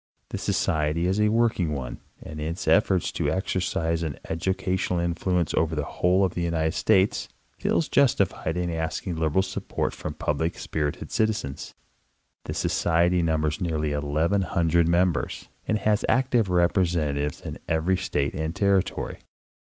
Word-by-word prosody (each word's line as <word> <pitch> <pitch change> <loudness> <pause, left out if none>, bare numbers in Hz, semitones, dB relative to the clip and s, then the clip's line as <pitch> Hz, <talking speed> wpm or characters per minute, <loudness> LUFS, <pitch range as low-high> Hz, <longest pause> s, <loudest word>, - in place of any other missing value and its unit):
The - - -4
Society 80 +2 0
is 95 +3 +1
a 105 - +4
work 115 0 +2
ing 80 -4 0
one, 65 -4 -5 0.2
and 75 0 -7
in 75 - -2
its 85 - -7
efforts 95 -3 +3
to - - -1
exercise 85 -3 -1
an 75 -6 -3
educational 90 +1 -1
influence 85 0 0
over 80 0 +1
the 75 - -1
whole 90 +6 +2
of 90 - -2
the 90 - -3
United 80 -2 0
States, 95 0 +2 0.3
feels 165 - +1
justified 100 - +2
in 90 -1 -1
asking 80 +2 -3
lib 80 -2 0
eral 95 - +4
support 95 0 -3
from 75 - -6
public 75 +2 -1
spirited 75 -2 -3
citizens. 110 -11 -1 0.7
The - - -4
Society 85 +1 +2
numbers 80 -2 0
nearly 80 -4 -1
eleven 75 +7 +1
hundred 85 -1 +2
members, 85 -2 0 0.2
and 110 - +2
has 105 0 +1
active 125 -5 +2
representatives 85 -5 +1
in - - -7
every 85 +3 +1
state 70 -4 -1
and 80 +3 -3
territory. 100 -2 0
85 Hz, 155 wpm, -26 LUFS, 80-95 Hz, 0.7 s, a